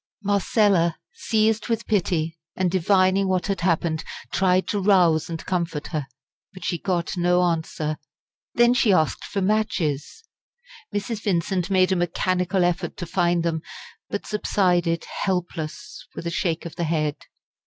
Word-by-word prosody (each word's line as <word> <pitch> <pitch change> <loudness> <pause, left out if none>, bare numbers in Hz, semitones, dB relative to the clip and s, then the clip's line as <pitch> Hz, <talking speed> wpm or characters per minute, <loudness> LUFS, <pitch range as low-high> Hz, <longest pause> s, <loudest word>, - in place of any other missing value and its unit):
Marcella, 200 -4 +2 0.2
seized 220 0 +1
with 230 -1 -1
pity, 170 -6 0 0.2
and 185 -2 0
divining 190 +1 +3
what 185 -1 0
had 195 -2 -2
happened, 165 -2 +1 0.3
tried 185 -1 +2
to 205 - -1
rouse 180 -6 +4
and 165 -1 -5
comfort 170 -5 -2
her. 150 -4 -3 0.5
But 185 - -8
she 175 - -1
got 175 0 -1
no 180 +1 +3
answer. 160 -3 -1 0.6
Then 240 0 +5
she 235 -4 +3
asked 160 -5 +2
for 200 -2 -2
matches. 185 - -1 0.7
Mrs. 205 +1 -3
Vincent 180 -2 0
made 185 -1 +3
a - - +3
mechanical 180 +1 0
effort 175 0 -1
to 175 - -4
find 175 0 +1
them, 165 -1 -1 0.5
but 205 - -4
subsided 175 -5 +1 0.2
helpless 180 -5 -4
with - - -6
a 170 - -2
shake 170 -1 -1
of 170 0 -8
the 170 - 0
head. 155 -2 0
180 Hz, 145 wpm, -24 LUFS, 165-195 Hz, 0.7 s, Then